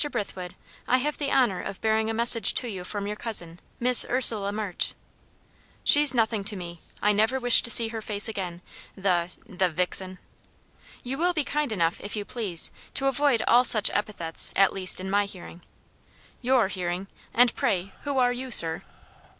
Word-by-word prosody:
Brithwood, 190 -7 -7 0.3
I 255 - +2
have 295 +3 -4
the 285 -2 -3
honour 235 -9 0
of 195 - -8
bearing 220 0 -1
a - - -3
message 235 0 +3
to 250 - +2
you 190 -5 -7
from 200 +2 -6
your 210 +1 -5
cousin 175 -7 -3 0.2
Miss 250 0 +6
Ursula 220 -5 +4
March." 205 -4 -3 0.9
"She's 290 -2 +6
nothing 220 -3 -1
to 210 - 0
me 175 -2 -10 0.2
I 210 - +2
never 220 +6 0
wish 245 -1 +5
to - - -3
see 230 0 +4
her 225 -1 -7
face 205 0 -1
again, 180 -5 -7 0.3
the 180 -3 -1 0.2
the 185 0 -2
vixen!" 180 +2 -3 0.9
"You 265 +3 -6
will 355 +1 0
be 310 -3 -2
kind 295 -2 -3
enough, 170 -5 -2
if 205 +1 -6
you 205 -1 -6
please, 205 -9 -1 0.2
to 275 - +1
avoid 270 -3 +1
all 245 +1 +4
such 215 -4 +6
epithets; 195 -6 -1
at 195 0 +2
least, 185 -1 +2
in 185 - -7
my 200 +1 0
hearing." 180 -3 -12 0.8
"Your 255 -4 +1
hearing! 185 -1 -5 0.3
And 245 0 +2
pray 190 0 -3
who 285 -2 -5
are 245 -1 +1
you, 255 +1 -7
sir?" 165 -8 +5
210 Hz, 180 wpm, -24 LUFS, 185-245 Hz, 0.9 s, Miss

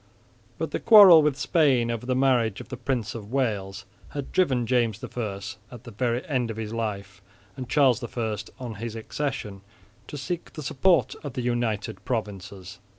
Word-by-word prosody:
But - - -3
the - - -2
quarrel 200 -8 +9
with 150 -3 +1
Spain 130 -5 +2
over 115 +1 -5
the 130 - +1
marriage 125 -5 +2
of - - -10
the 130 - -5
Prince 120 -3 -2
of 110 -2 -8
Wales 100 -7 -2 0.3
had 140 - -5
driven 130 -10 +2
James 115 -3 0
I 105 -5 -4 0.3
at 120 -1 -11
the 120 - -10
very 120 - -1
end 130 -8 -1
of 110 - -5
his 110 0 -5
life, 100 -4 -4 0.3
and 130 -2 -7
Charles 130 -1 +3
I 110 -2 -3 0.2
on 125 -3 -5
his 115 +1 -5
accession, 115 -4 -4 0.5
to 145 - -7
seek 175 +5 -5
the 155 - -7
support 170 +7 +2
of 145 -4 -6
the 125 - -3
United 115 -5 -2
Provinces. 100 -4 -5
120 Hz, 175 wpm, -25 LUFS, 110-135 Hz, 0.5 s, quarrel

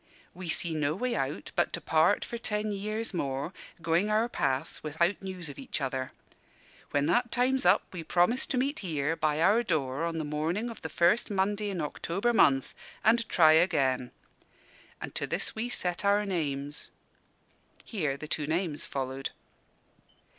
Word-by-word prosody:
We 180 -1 -7
see 165 0 0
no 150 -1 0
way 250 +5 -1
out 135 -6 -3
but - - +2
to - - 0
part 160 +5 +3
for 235 - -5
ten 210 -2 -2
years 215 +2 -3
more, 140 0 -2 0.3
going 170 +5 +2
our 215 +2 +3
paths 140 - -1
without 170 +5 0
news 185 -3 -5
of 145 - -8
each 265 - -3
other. 130 -1 -2 0.8
When 145 0 +1
that 240 +8 +2
time's 260 +2 +2
up, - - +5
we 175 -3 -5
promise 180 +10 +2
to 260 - -1
meet 275 +4 0
here, 160 -4 -1
by 155 -1 0
our 210 +6 +5
door, 150 - -1
on 165 -1 -2
the 160 - -1
morning 160 +10 -2
of 225 - -11
the 160 - -5
first 175 +10 +3
Monday 205 +1 0
in 185 -4 -3
October 190 +9 -1
month, 135 - +4 0.3
and 230 +1 +3
try 155 -3 +6
again. 135 -7 +2 0.9
And - - -7
to - - -2
this - - -1
we 230 +2 -3
set 180 -6 -1
our 205 +1 +3
names." 145 -6 -2 1.0
here 155 - -2
the 155 - -7
two 150 -1 -2
names 160 -1 -1
followed. 135 0 -3
170 Hz, 170 wpm, -29 LUFS, 150-210 Hz, 1.0 s, try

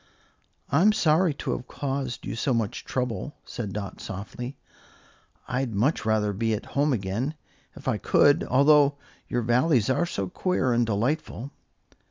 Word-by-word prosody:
"I'm 180 +10 +5
sorry 170 -3 +3
to - - -3
have 125 - -4
caused 135 -3 -3
you - - -4
so 125 +2 0
much 115 -3 -2
trouble," 125 +1 -3
said 110 -5 -5
Dot, 100 -1 -6
softly. 110 +7 -6 0.9
"I'd 125 -3 -2
much 115 +2 +1
rather 105 -2 +2
be 110 +2 0
at 105 - -6
home 145 +2 +1
again, 115 +6 -2 0.4
if - - -11
I - - +1
could, 145 0 +4
although 140 +1 +4 0.3
your 120 -1 -1
Valleys 125 0 +3
are 175 +6 +1
so 100 - -3
queer 130 - 0
and 120 -1 +2
delightful." 130 +4 -1
125 Hz, 150 wpm, -26 LUFS, 110-145 Hz, 0.9 s, I'm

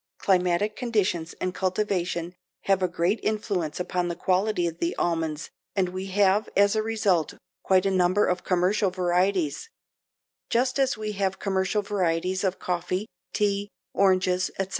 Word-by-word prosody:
Climatic 185 +2 +1
conditions 205 -9 -1
and 185 0 -2
cultivation 185 -3 -1 0.3
have 195 -1 +2
a 185 - +3
great 180 +4 0
influence 195 -8 -2
upon 180 0 -1
the 170 - -3
quality 185 0 +1
of 165 0 -4
the 170 - -1
almonds 165 -2 -2 0.2
and 190 -3 +1
we 185 +1 -5
have 200 +2 +2
as 200 +1 +4
a 215 - +2
result 215 -7 0 0.3
quite 185 0 +3
a 195 - +2
number 185 +2 +3
of 180 0 -1
commercial 185 +3 +2
varieties, 180 - 0 0.8
just 255 +3 +1
as 270 -3 +2
we 215 -1 -3
have 195 -2 -1
commercial 190 +1 0
varieties 185 -2 0
of 190 -1 0
coffee, 180 +2 -2 0.3
tea, 205 -1 0 0.2
oranges, 185 -1 +2
etc. 195 -1 -2
185 Hz, 150 wpm, -26 LUFS, 180-205 Hz, 0.8 s, as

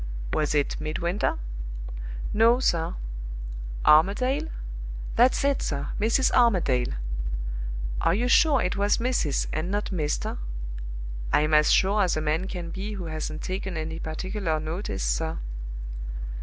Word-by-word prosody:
"Was 150 -1 +1
it 145 +1 +1
'Midwinter'?" 170 +5 0 1.0
"No, 230 +3 +5
sir. 170 -10 +1 0.9
"Armadale?" 250 - +4 0.7
"That's 250 +3 +5
it, 280 0 +2
sir. 140 -1 -2
Mrs. 230 +5 +3
Armadale." 175 - +3 1.1
"Are 165 - +3
you 240 +4 +1
sure 275 +1 +5
it 180 - 0
was 205 +1 +3
'Mrs.' 235 - +1
and 155 +3 -1
not 205 +2 -1
'Mr.'?" 150 - -1 0.9
"I'm 150 +1 +3
as 150 0 +6
sure 200 +2 +4
as 180 -5 +2
a - - 0
man 155 +4 0
can 175 -3 -5
be 200 +4 -4
who 190 -4 -5
hasn't 155 -1 -4
taken 190 -1 -3
any 160 +1 -3
particular 165 +1 -2
notice, 160 - -3
sir." - - 0
180 Hz, 130 wpm, -27 LUFS, 155-210 Hz, 1.1 s, as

